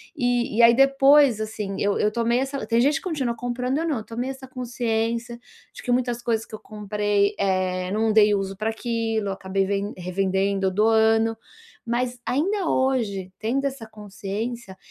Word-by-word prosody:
E 245 Hz, -2 st, 0 dB
e -, -, +7 dB
aí, 235 Hz, 0 st, +7 dB
depois, 275 Hz, -2 st, +5 dB
assim, 210 Hz, -2 st, -4 dB
eu 200 Hz, 0 st, +1 dB
eu 210 Hz, -, +1 dB
tomei 235 Hz, +2 st, +1 dB
essa 270 Hz, 0 st, -2 dB
tem 230 Hz, 0 st, +2 dB
gente 280 Hz, +3 st, +3 dB
que -, -, -7 dB
continua 275 Hz, -10 st, -2 dB
comprando, 250 Hz, +4 st, -2 dB
eu 330 Hz, -, -1 dB
não, 250 Hz, -9 st, -1 dB
tomei 240 Hz, +4 st, -4 dB
essa 265 Hz, 0 st, -8 dB
consciência 235 Hz, -1 st, -2 dB, 0.3 s
de -, -, -10 dB
que 245 Hz, -, -3 dB
muitas 245 Hz, -1 st, 0 dB
coisas 225 Hz, -2 st, -1 dB
que -, -, -21 dB
eu 215 Hz, -, -6 dB
comprei, 205 Hz, -1 st, -1 dB
eh, 185 Hz, -2 st, 0 dB
não 220 Hz, +1 st, +1 dB
dei 210 Hz, -1 st, +5 dB
uso 195 Hz, 0 st, -3 dB
pra 215 Hz, +3 st, -2 dB
aquilo, 225 Hz, -2 st, -2 dB
acabei 195 Hz, 0 st, -1 dB
vend 200 Hz, +1 st, -2 dB
revendendo 190 Hz, +2 st, 0 dB
ou 185 Hz, -, -1 dB
doando, 225 Hz, +1 st, +3 dB, 0.5 s
mas 245 Hz, +1 st, -2 dB
ainda 345 Hz, +9 st, 0 dB
hoje, 220 Hz, -8 st, 0 dB
tendo 255 Hz, +6 st, -1 dB
essa 265 Hz, -5 st, -4 dB
consciência, 210 Hz, +1 st, -6 dB
225 Hz, 175 wpm, -24 LUFS, 205-245 Hz, 0.5 s, e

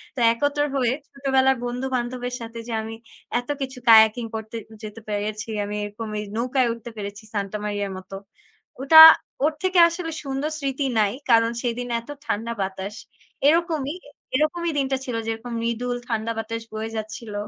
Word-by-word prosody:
তো 260 Hz, -, -5 dB
একত্র 285 Hz, +4 st, 0 dB, 0.2 s
হয়ে 250 Hz, -2 st, +2 dB, 0.2 s
ছোটবেলার 265 Hz, -1 st, +2 dB
বন্ধু-বান্ধবের 250 Hz, 0 st, -3 dB
সাথে 230 Hz, 0 st, -7 dB
যে 230 Hz, -, -4 dB
আমি 225 Hz, +1 st, -6 dB, 0.4 s
এত 245 Hz, -, -10 dB
কিছু 265 Hz, -1 st, -4 dB
কায়াকিং 220 Hz, +1 st, +7 dB
করতে 220 Hz, +1 st, -6 dB, 0.3 s
যেতে 215 Hz, +1 st, -8 dB
পেরেছি, 210 Hz, +2 st, -3 dB, 0.2 s
আমি 205 Hz, +1 st, -5 dB
এরকম 215 Hz, +2 st, -7 dB
এই 210 Hz, -, -4 dB
নৌকায় 250 Hz, +1 st, +1 dB
উঠতে 235 Hz, 0 st, -9 dB
পেরেছি 205 Hz, +1 st, -6 dB
সান্টা 200 Hz, 0 st, -2 dB
মারিয়ার 205 Hz, -1 st, -2 dB
মত, 185 Hz, 0 st, -12 dB, 0.7 s
ওটা 315 Hz, +4 st, +9 dB, 0.4 s
ওর 310 Hz, -, +2 dB
থেকে 370 Hz, -1 st, +3 dB
আসলে 335 Hz, -1 st, -5 dB
সুন্দর 275 Hz, +2 st, -2 dB
স্মৃতি 275 Hz, 0 st, -2 dB
নাই। 205 Hz, -2 st, +3 dB, 0.2 s
কারণ 230 Hz, 0 st, +5 dB
সেদিন 245 Hz, 0 st, -2 dB
এত 235 Hz, -, -21 dB, 0.2 s
ঠান্ডা 230 Hz, -2 st, -2 dB
বাতাস। 195 Hz, +2 st, -4 dB, 0.5 s
এরকমই, 320 Hz, -2 st, +1 dB, 0.4 s
এরকমই 330 Hz, +3 st, +1 dB
দিনটা 270 Hz, 0 st, 0 dB
ছিল 245 Hz, -3 st, -3 dB
যেরকম 225 Hz, +2 st, -4 dB
মৃদুল 240 Hz, +1 st, -1 dB
ঠান্ডা 225 Hz, 0 st, -1 dB
বাতাস 225 Hz, +1 st, -4 dB
বয়ে 220 Hz, +1 st, -4 dB
যাচ্ছিল, 215 Hz, 0 st, -6 dB
235 Hz, 155 wpm, -24 LUFS, 220-270 Hz, 0.7 s, ওটা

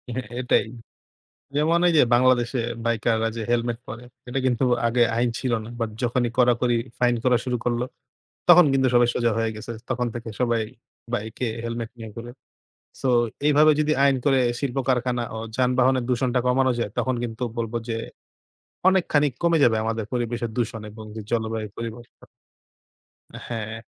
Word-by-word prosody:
হ্যাঁ, 130 Hz, -4 st, -4 dB
এটাই 125 Hz, -, +2 dB, 0.9 s
যেমন 160 Hz, +3 st, +3 dB
এই 175 Hz, -, +3 dB
যে, -, -, +7 dB
বাংলাদেশে 125 Hz, 0 st, +3 dB, 0.3 s
বাইকাররা 115 Hz, -1 st, +1 dB
যে, 115 Hz, -, -3 dB
helmet 120 Hz, -1 st, 0 dB
পরে 120 Hz, +3 st, -7 dB, 0.2 s
এটা 130 Hz, -, -2 dB
কিন্তু 125 Hz, 0 st, +1 dB, 0.2 s
আগে 120 Hz, +1 st, +3 dB
আইন 120 Hz, +1 st, +2 dB
ছিল 130 Hz, -2 st, -2 dB
না। -, -, -9 dB
but 115 Hz, -1 st, -1 dB
যখনই 120 Hz, 0 st, +1 dB
কড়াকড়ি 120 Hz, -1 st, +3 dB, 0.2 s
fine 120 Hz, -1 st, +2 dB
করা 125 Hz, -1 st, +4 dB
শুরু 125 Hz, -1 st, -1 dB
করল 120 Hz, -1 st, 0 dB, 0.7 s
তখন 175 Hz, 0 st, +9 dB
কিন্তু 130 Hz, -1 st, +3 dB
সবাই 120 Hz, 0 st, +5 dB
সোজা 120 Hz, -2 st, +2 dB
হয়ে 115 Hz, 0 st, +1 dB
গেছে। 110 Hz, +2 st, -7 dB, 0.2 s
তখন 125 Hz, -1 st, 0 dB
থেকে 120 Hz, -1 st, -6 dB
সবাই 120 Hz, -2 st, +2 dB, 0.5 s
বাইকে 110 Hz, +2 st, -3 dB, 0.2 s
helmet 115 Hz, -1 st, -4 dB
নিয়ে 110 Hz, -1 st, -8 dB
ঘুরে। 120 Hz, +1 st, -7 dB, 0.7 s
so 135 Hz, -, 0 dB, 0.4 s
এইভাবে 150 Hz, +1 st, +6 dB
যদি 150 Hz, 0 st, +2 dB
আইন 140 Hz, -1 st, +4 dB
করে 135 Hz, -2 st, +4 dB, 0.2 s
শিল্প 135 Hz, -2 st, -3 dB
কারখানা 125 Hz, -1 st, +1 dB
ও -, -, -4 dB, 0.2 s
যানবাহনের 130 Hz, 0 st, +2 dB
দূষণটা 125 Hz, 0 st, +1 dB
কমানো 130 Hz, +1 st, +3 dB
যায় 115 Hz, -3 st, -2 dB
তখন 130 Hz, -, +1 dB
কিন্তু 115 Hz, 0 st, -5 dB
বলব 115 Hz, -1 st, -3 dB, 0.2 s
যে, 115 Hz, -, -1 dB, 0.9 s
অনেকখানি 170 Hz, -6 st, +3 dB
ক -, -, -28 dB
কমে 170 Hz, -1 st, +4 dB
যাবে 115 Hz, -3 st, +4 dB
আমাদের 110 Hz, -1 st, -2 dB
পরিবেশের 120 Hz, -1 st, -2 dB
দূষণ 115 Hz, -2 st, -2 dB
এবং 110 Hz, +1 st, -10 dB, 0.2 s
জলবায়ু 110 Hz, -2 st, -1 dB
পরিবর্তন। 115 Hz, +1 st, -8 dB, 1.2 s
হ্যাঁ। 115 Hz, -1 st, -5 dB
120 Hz, 160 wpm, -24 LUFS, 115-130 Hz, 1.2 s, তখন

